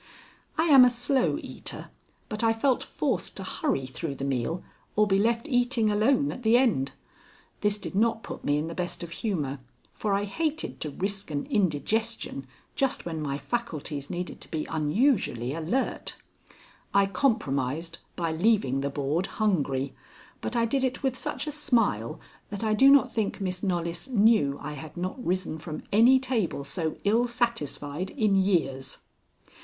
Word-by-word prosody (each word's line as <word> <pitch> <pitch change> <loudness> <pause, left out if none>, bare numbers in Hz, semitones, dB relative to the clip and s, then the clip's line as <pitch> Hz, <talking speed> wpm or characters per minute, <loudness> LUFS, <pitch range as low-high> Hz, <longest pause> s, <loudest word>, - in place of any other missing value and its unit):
I 320 - +3
am 280 -6 +8
a 250 - +7
slow 245 +2 +1
eater, - - -7 0.4
but 215 +1 -3
I 225 0 +4
felt 250 +3 +1
forced - - -2
to - - -3
hurry 290 - -1
through 140 +3 -4
the 135 - -4
meal 140 +6 -1 0.3
or 210 - +5
be 195 -1 +2
left 230 +6 +1
eating 245 -4 +2
alone 255 +7 +3
at - - -7
the 230 0 +5
end. 215 - +2 0.7
This 210 0 +2
did 205 - -7
not 225 +2 +2
put - - -7
me 145 0 +2
in 150 - -1
the 165 - -5
best 175 0 -3
of 170 - -7
humor, 150 - -2 0.3
for 205 -2 0
I 200 - 0
hated 310 +9 -2
to 155 - -2
risk 195 +5 -2
an 145 -2 -2
indigestion 205 - 0 0.3
just 270 -2 0
when 165 -2 -3
my 140 -2 -2
faculties 150 - -3
needed 180 +1 -5
to - - -11
be 155 -2 -2
unusually 155 - +1
alert. 165 - -2 0.8
I 200 0 +6
compromised 165 - 0 0.2
by 165 -2 -1
leaving 160 - +2
the 140 - -1
board 145 +6 -1
hungry, 140 -11 +1 0.5
but 245 - -3
I 230 -1 +3
did 265 +3 0
it 260 +1 -1
with 265 -2 +1
such - - -3
a 300 - -3
smile 225 - +1 0.3
that 200 +1 -5
I 215 -1 +2
do 265 +6 +6
not 275 -3 +5
think 220 -3 -1
Miss 185 -2 -2
Knollys 170 -3 -2
knew 210 - +4
I 150 +1 -4
had 155 +3 -9
not 185 +8 -4
risen 180 -4 -1
from 155 -1 -6
any 235 +6 +7
table 240 - -1
so 160 +3 -3
ill 230 +4 +3
satisfied 185 - -2
in 210 -3 +1
years. 170 -9 +1
195 Hz, 170 wpm, -27 LUFS, 155-235 Hz, 0.8 s, am